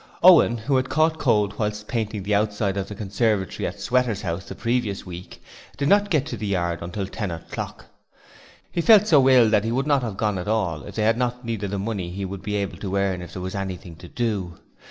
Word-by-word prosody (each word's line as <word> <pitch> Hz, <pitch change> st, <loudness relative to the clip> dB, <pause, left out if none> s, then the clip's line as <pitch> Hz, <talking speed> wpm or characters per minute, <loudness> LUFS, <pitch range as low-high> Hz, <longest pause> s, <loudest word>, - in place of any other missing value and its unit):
Owen 170 Hz, -9 st, +7 dB
who 130 Hz, +4 st, 0 dB
had 130 Hz, 0 st, -1 dB
caught 160 Hz, +1 st, +2 dB
cold 105 Hz, -6 st, +1 dB
whilst 105 Hz, -1 st, -2 dB
painting 110 Hz, -4 st, -2 dB
the 105 Hz, +2 st, -1 dB
outside 105 Hz, -1 st, +1 dB
of 100 Hz, -1 st, -2 dB
the 105 Hz, -, -7 dB
conservatory 105 Hz, -1 st, -1 dB
at -, -, -7 dB
Sweater's 120 Hz, -5 st, 0 dB
house 85 Hz, +3 st, -3 dB
the -, -, -8 dB
previous 115 Hz, -4 st, -1 dB
week 90 Hz, 0 st, -10 dB, 0.3 s
did 140 Hz, -, 0 dB
not 205 Hz, 0 st, +4 dB
get 155 Hz, -6 st, +2 dB
to 125 Hz, -6 st, -5 dB
the 105 Hz, 0 st, -4 dB
yard 85 Hz, -3 st, -1 dB
until 90 Hz, +4 st, -4 dB
ten 100 Hz, +1 st, -4 dB
o'clock. 85 Hz, -1 st, -6 dB, 0.9 s
He 170 Hz, -, 0 dB
felt 210 Hz, +2 st, +7 dB
so 140 Hz, -9 st, +5 dB
ill 125 Hz, -3 st, +6 dB
that 105 Hz, -2 st, +3 dB
he 115 Hz, -, -1 dB
would 130 Hz, +3 st, 0 dB
not 145 Hz, -2 st, +3 dB
have 110 Hz, -5 st, -4 dB
gone 105 Hz, -3 st, 0 dB
at 90 Hz, -, -6 dB
all 95 Hz, -8 st, 0 dB
if -, -, -10 dB
they 110 Hz, -, 0 dB
had 115 Hz, +2 st, +2 dB
not 125 Hz, 0 st, -2 dB
needed 110 Hz, -4 st, -3 dB
the 100 Hz, -, -2 dB
money 100 Hz, -3 st, -3 dB
he 95 Hz, +2 st, -4 dB
would 95 Hz, 0 st, -6 dB
be 105 Hz, +1 st, -3 dB
able 100 Hz, -1 st, -2 dB
to 100 Hz, -1 st, -4 dB
earn 95 Hz, -2 st, 0 dB
if 90 Hz, -, -9 dB
there 90 Hz, -, -6 dB
was 95 Hz, -, -4 dB
anything 95 Hz, -3 st, -5 dB
to 90 Hz, -, -11 dB
do. 100 Hz, -6 st, -2 dB
105 Hz, 235 wpm, -24 LUFS, 95-120 Hz, 0.9 s, Owen